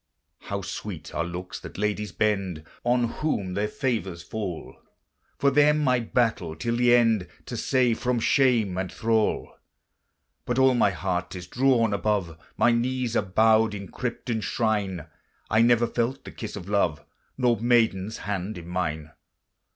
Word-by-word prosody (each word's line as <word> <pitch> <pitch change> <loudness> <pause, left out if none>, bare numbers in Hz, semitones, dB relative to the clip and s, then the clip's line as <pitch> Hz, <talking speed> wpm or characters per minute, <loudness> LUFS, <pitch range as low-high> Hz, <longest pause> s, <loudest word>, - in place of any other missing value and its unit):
How 100 -1 -5
sweet 90 -5 -6
are 85 - 0
looks 90 +2 -6
that - - -10
ladies 105 0 -1
bend 95 -6 -1 0.2
On 120 0 +2
whom 115 -7 -2
their 105 +3 0
favors 105 - -2
fall! 95 -3 -5 0.6
For 140 - +3
them 150 +1 +4
I 125 -1 +3
battle 110 -8 0
till 115 +8 -2
the 120 0 +5
end, 115 -6 +3 0.2
To - - -6
save 125 -3 +1
from 125 -1 0
shame 115 -7 +2
and 95 -1 -3
thrall: 110 -1 0 0.9
But 125 - -1
all 130 0 +5
my 120 -4 +4
heart 90 0 -3
is 90 -1 -7
drawn 120 +1 +2
above, 100 -4 0 0.2
My 120 - +4
knees 120 0 0
are - - +4
bowed 110 +2 +3
in 100 -1 -7
crypt 125 -1 -5
and 110 -2 -1
shrine: 100 -7 -1 0.5
I 110 +2 +4
never 120 0 +4
felt 120 +3 -2
the - - -8
kiss 110 - -7
of 95 -3 -8
love, 85 -8 0 0.3
Nor 120 -4 +2
maiden's 110 -4 +2
hand 100 0 -3
in 85 -1 -9
mine. 80 -4 -3
110 Hz, 160 wpm, -26 LUFS, 95-120 Hz, 0.9 s, the